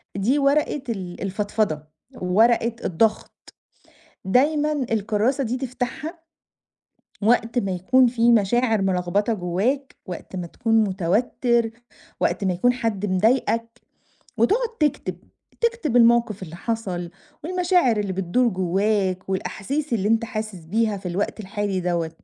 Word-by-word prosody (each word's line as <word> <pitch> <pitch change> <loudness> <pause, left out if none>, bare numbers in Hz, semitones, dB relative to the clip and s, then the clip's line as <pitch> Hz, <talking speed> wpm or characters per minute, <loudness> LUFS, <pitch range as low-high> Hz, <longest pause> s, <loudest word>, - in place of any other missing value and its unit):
دي 230 +9 +1
ورقة 285 0 +2
ال 185 -6 -5
الفضفضة، 205 -4 -1 0.4
ورقة 225 +5 +3
الضغط، 215 +5 -1 0.7
دايمًا 295 +8 +2 0.2
الكراسة 225 +5 +1
دي 245 +2 -2
تفتَحها 265 +6 -4 1.0
وقت 230 +2 +2
ما 195 -5 -1
يكُون 250 +8 +4
في 235 0 +3
مشاعر 225 0 +2
ملخبطة 190 +3 0
جوّاك، 210 +10 -1
وقت 185 +1 -7
ما 180 - -4
تكُون 225 +4 +1
متوتّر، 225 +5 +1 0.5
وقت - - 0
ما 190 - +2
يكُون 245 +8 +2
حد 225 -5 -2
مضايقك، 230 +4 +1 0.6
وتقعُد 445 - +2
تكتب. 220 - 0 0.4
تكتب 465 - 0
الموقِف 235 -4 +4
اللي 170 -1 -8
حصَل، 185 -6 -3 0.3
والمشاعر 355 -7 +2
اللي 205 -2 -1
بتدُور 195 +7 +1
جوّاك، 190 0 0
والأحاسيس 255 +9 -3
اللي 205 -3 +1
إنت 225 +1 +2
حاسس 215 -6 -5
بيها 215 +5 0
في 190 -1 -9
الوقت 195 +5 -2
الحالي 200 -1 -2
دوّة. 170 -2 -1
220 Hz, 120 wpm, -23 LUFS, 190-245 Hz, 1.0 s, يكُون